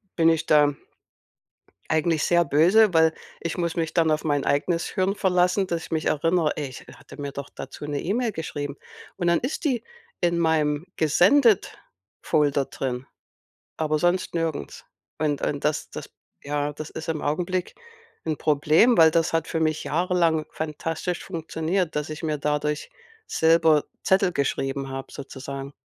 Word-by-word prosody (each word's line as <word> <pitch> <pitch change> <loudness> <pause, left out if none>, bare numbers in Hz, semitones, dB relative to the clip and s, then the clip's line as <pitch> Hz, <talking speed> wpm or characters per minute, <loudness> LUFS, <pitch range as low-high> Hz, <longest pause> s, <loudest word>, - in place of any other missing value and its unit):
bin 165 -1 +4
ich 165 -1 +1
da 145 -1 +4 1.2
eigentlich 160 0 +1
sehr 175 0 +3
böse, 180 +9 +4
weil 160 -1 +4 0.3
ich 170 - -3
muss 170 -2 -1
mich 165 -2 -2
dann 165 -2 +3
auf 155 0 +1
mein 145 -3 0
eigenes 165 +4 0
Hirn 190 0 0
verlassen, 180 0 +2
dass 170 -2 -3
ich - - -12
mich 160 -1 -1
erinnere: 165 +1 +2
„Ey, 145 -2 -3
ich 130 - -10
ha - - -15
hatte - - -14
mir 140 -1 -4
doch 140 0 -6
dazu 135 +2 -8
'ne 145 -1 -3
E-Mail 230 +6 0
geschrieben.“ 145 -4 -5 0.4
Und 175 -2 0
dann 170 -1 +3
ist 255 +5 -4
die 255 -6 0 0.4
in 170 -1 +1
meinem 155 -2 +1
Gesendet-Folder 155 - +2
drin, 130 -1 -4 0.7
aber 155 -1 0
sonst 175 +2 +1
nirgends. 165 -3 -3 0.3
Und 150 -2 -1
und 145 -1 -2
das 150 0 -1
das - - -8 0.3
ja, 145 0 -2
das 155 +1 -7
ist 160 - -7
im 160 -2 -2
Augenblick 180 +4 -2 0.5
'n 160 -1 0
Problem, 155 - +3
weil 160 -1 +7
das 165 -1 +1
hat 165 -1 0
für 160 - -2
mich 155 -1 0
jahrelang 170 -1 +1
fantastisch 165 +3 -4
funktioniert, 165 0 -2
dass 150 0 -2
ich 155 0 -6
mir 155 -2 -1
dadurch 150 - -1 0.4
selber 160 -2 +4 0.2
Zettel 190 -1 +3
geschrieben 135 -1 -1
habe 135 0 -6
sozusagen. 140 0 -7
160 Hz, 160 wpm, -24 LUFS, 145-175 Hz, 1.2 s, weil